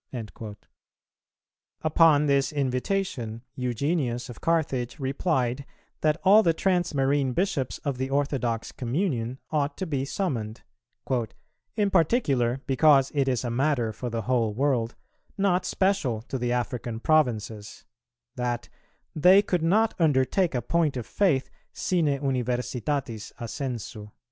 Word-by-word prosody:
"[281:3] 110 -2 -7 1.3
Upon 155 -1 +5
this 140 -2 +2
invitation, 130 - -2
Eugenius 125 0 -1
of 120 - -10
Carthage 140 -7 0
replied, 135 -2 -1 0.4
that 155 +1 +2
all 200 +3 +7
the 165 -5 +2
transmarine 145 -8 +1
Bishops 175 -9 -1
of 140 -3 -2
the 130 0 -2
orthodox 135 -5 -1
communion 125 - -2
ought 145 -1 0
to 190 - -3
be 140 -6 -2
summoned, 130 - -3 1.1
"in 205 -2 +1
particular 140 - +2
because 135 0 +4
it 140 -2 +1
is 125 -2 0
a 120 - -2
matter 125 -3 +1
for 125 +3 -5
the 115 -1 -3
whole 115 -3 0
world, 125 -3 0 0.4
not 190 -2 +2
special 165 - 0
to 130 +1 -5
the 120 0 -1
African 120 -1 -2
provinces," 115 -8 0 0.5
that 120 -1 -3 0.5
"they 185 +6 +6
could 180 -4 0
not 215 +7 +3
undertake 155 +2 +2
a 120 - -1
point 160 -4 +1
of 120 - -4
faith 150 - +1 0.3
sine 175 -4 0
universitatis 125 -3 -2
assensu." 115 -4 -5
135 Hz, 125 wpm, -26 LUFS, 120-160 Hz, 1.3 s, all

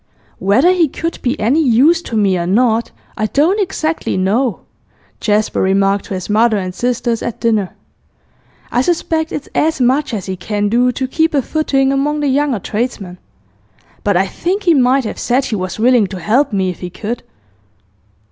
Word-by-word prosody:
'Whether 240 - +3
he 355 -3 +3
could 330 +4 -5
be 255 +4 -1
any 250 +9 +2
use 285 +7 +4
to 230 - -4
me 200 -3 +2
or 170 -1 -2
not, 225 +3 +2 0.3
I 215 - -1
don't 325 - +2
exactly 330 - -2
know,' 210 +5 0 0.6
Jasper 210 0 0
remarked 195 +1 +1
to 195 - -5
his 185 - -5
mother 220 +1 +3
and 185 -2 -4
sisters 240 +1 -1
at 235 - -4
dinner. 220 -5 0 1.0
'I 245 - +2
suspect 320 +1 -1
it's 290 - -5
as 315 -1 +1
much 260 +4 +1
as 195 - -5
he 190 - -4
can 205 +3 -2
do 245 +3 +2
to 260 +1 -3
keep 320 +3 0
a 280 - +3
footing 275 -3 +1
among 295 +2 0
the 290 - +1
younger 280 -2 +1
tradesmen. 205 -3 -4 0.8
But 200 -3 +2
I 190 - +2
think 370 - -3
he 345 - +4
might 265 -1 +3
have - - -5
said 255 +2 +1
he 220 - -2
was 185 -2 -4
willing 235 -2 +3
to 185 -1 -7
help 245 - +1
me 190 -2 0
if 175 - -11
he 180 - -6
could. 220 +6 -5
240 Hz, 185 wpm, -16 LUFS, 205-285 Hz, 1.0 s, use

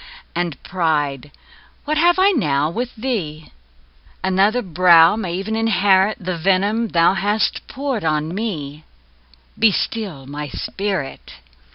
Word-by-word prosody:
And 175 -5 -2
pride, 150 -6 -1 0.6
what 305 +1 -1
have 345 +2 +4
I 385 +2 +5
now 150 - 0
with 245 +6 -4
thee? 190 -11 -4 0.7
Another 195 +6 +2
brow 170 -1 +5
may 185 -5 -3
ev'n 215 +3 -3
inherit 205 -2 +2
The 180 -3 -4
venom 200 +6 +1
thou 170 -2 +3
hast 205 +2 -1
poured 270 -6 -3
on 155 +1 -1
me 155 -9 -5 0.8
Be 225 -1 +5
still 190 -9 -3
my 145 +2 -6
spirit! 190 0 -4
190 Hz, 125 wpm, -20 LUFS, 160-220 Hz, 0.8 s, I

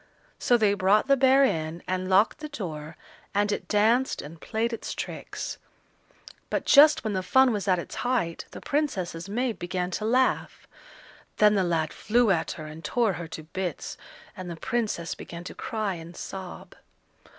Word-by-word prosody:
So 245 - +4
they 210 -3 +3
brought 200 +4 +3
the 275 - +5
bear 265 +1 +5
in, 160 -8 -1
and 185 0 -2
locked 200 +9 +4
the 305 0 -6
door, 160 - -6 0.4
and 205 +1 +2
it - - -3
danced 225 +5 +2
and 155 +3 -9
played 230 +2 -1
its 230 - -5
tricks; - - -5 0.9
but - - -1
just 300 +1 +7
when 215 -2 -1
the 190 - 0
fun 245 +8 +4
was 205 -2 -3
at 185 -1 +4
its 170 - -6
height, 235 -10 -1
the - - -10
Princess's 195 - -2
maid 240 +2 -1
began 180 0 -2
to 215 - -3
laugh. 255 +3 +1 0.7
Then 210 0 +6
the 195 -2 +2
lad 165 -3 0
flew 230 0 +2
at 170 -4 0
her 155 - -8
and 155 +2 -9
tore 230 -5 +1
her 170 -1 -6
to 160 -1 -8
bits, 180 +3 -4 0.4
and 185 -3 -7
the 170 - -5
Princess 210 -2 -2
began 170 0 -9
to 180 - -7
cry 215 -3 -2
and 170 0 -9
sob. 190 -2 -8
195 Hz, 175 wpm, -27 LUFS, 170-235 Hz, 0.9 s, just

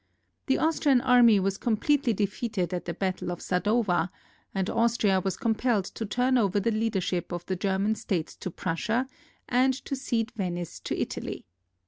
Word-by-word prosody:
The 270 - +3
Austrian 305 -4 +3
army 245 -4 +6
was 195 +1 -1
completely 245 +3 +2
de 210 -1 +1
feated 200 -3 -3
at 180 - -3
the 170 - -3
battle 185 -1 -2
of 175 - -4
Sadowa, 185 -2 +1 0.4
and 190 -1 -1
Austria 230 -4 +2
was 190 0 -2
compelled 230 -4 +1
to 225 - -4
turn 250 +4 +2
over 205 -2 +2
the 230 +4 +1
leadership 210 -6 -1
of 175 0 -4
the 185 - -2
German 195 +3 +1
states 180 -6 -3
to - - -5
Prussia 215 +10 -1 0.4
and 255 +1 +3
to 275 - -2
cede 240 -4 -1
Venice 175 -6 -4
to - - -3
Italy. - - -4
210 Hz, 165 wpm, -27 LUFS, 185-240 Hz, 0.4 s, army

